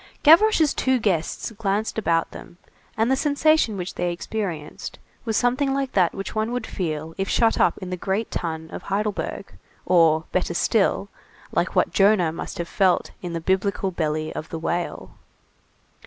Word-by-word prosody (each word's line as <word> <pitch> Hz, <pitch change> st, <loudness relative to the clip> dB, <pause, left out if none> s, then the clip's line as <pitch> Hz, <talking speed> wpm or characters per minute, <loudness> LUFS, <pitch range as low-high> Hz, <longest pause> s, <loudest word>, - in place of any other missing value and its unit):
Gavroche's 325 Hz, -1 st, +6 dB
two 260 Hz, 0 st, +1 dB
guests 195 Hz, -3 st, -1 dB
glanced 215 Hz, 0 st, -1 dB
about 165 Hz, -5 st, +1 dB
them, 175 Hz, -, -11 dB, 0.4 s
and 225 Hz, +3 st, +2 dB
the -, -, +4 dB
sensation 290 Hz, -5 st, +2 dB
which 180 Hz, -1 st, -4 dB
they 175 Hz, 0 st, -1 dB
experienced 175 Hz, -4 st, -5 dB, 0.3 s
was 225 Hz, -2 st, 0 dB
something 270 Hz, +3 st, +1 dB
like 275 Hz, -1 st, -1 dB
that 180 Hz, -4 st, +2 dB
which 195 Hz, -, -5 dB
one 220 Hz, +1 st, -1 dB
would 250 Hz, 0 st, -2 dB
feel 160 Hz, -3 st, -4 dB
if 195 Hz, -, -1 dB
shut 225 Hz, -1 st, +2 dB
up -, -, +3 dB
in 185 Hz, -1 st, -7 dB
the 180 Hz, -, -2 dB
great 195 Hz, +5 st, -2 dB
tun 160 Hz, -1 st, -4 dB
of -, -, -6 dB
Heidelberg, 205 Hz, +1 st, -3 dB, 0.3 s
or, 165 Hz, -3 st, +4 dB
better -, -, -1 dB
still, -, -, +1 dB, 0.4 s
like -, -, -1 dB
what -, -, +2 dB
Jonah 195 Hz, -4 st, +4 dB
must 165 Hz, -, -6 dB
have 170 Hz, -1 st, -3 dB
felt 185 Hz, -1 st, +1 dB
in 175 Hz, -2 st, -5 dB
the 165 Hz, -, -2 dB
biblical 190 Hz, +2 st, 0 dB
belly 155 Hz, -2 st, -2 dB
of 155 Hz, -, -6 dB
the 165 Hz, -, -4 dB
whale. 170 Hz, +2 st, -3 dB
195 Hz, 170 wpm, -23 LUFS, 170-225 Hz, 0.4 s, Gavroche's